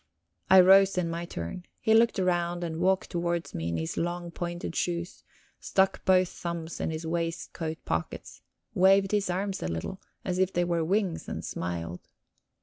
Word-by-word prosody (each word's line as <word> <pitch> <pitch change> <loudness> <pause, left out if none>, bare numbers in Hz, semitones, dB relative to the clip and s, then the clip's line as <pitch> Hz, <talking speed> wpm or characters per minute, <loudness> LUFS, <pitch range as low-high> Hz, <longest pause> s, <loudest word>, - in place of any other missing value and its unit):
I 190 0 +9
rose 195 +1 +6
in 170 -2 0
my 170 +1 -3
turn. 170 - -6
He 220 - +2
looked 230 0 +4
round 175 -2 0
and 165 -1 -4
walked 190 +1 +1
towards 170 -1 -2
me 80 0 -3
in 85 - -1
his 80 0 -3
long, 175 0 -2
pointed 175 0 -5
shoes, 175 0 -2 0.4
stuck 190 0 +1
both 185 -1 +4
thumbs 170 -1 -5
in - - -1
his 160 +1 -4
waistcoat 165 -1 -3
pockets, 80 +1 -4 0.3
waved 195 +1 +4
his 205 -3 +1
arms 190 +2 -2
a - - -2
little, 85 - -4 0.2
as 185 -1 -1
if 190 0 +2
they 175 - +1
were 170 -1 0
wings, 185 0 -1
and - - -5
smiled. 85 0 -4
175 Hz, 170 wpm, -28 LUFS, 165-190 Hz, 0.4 s, I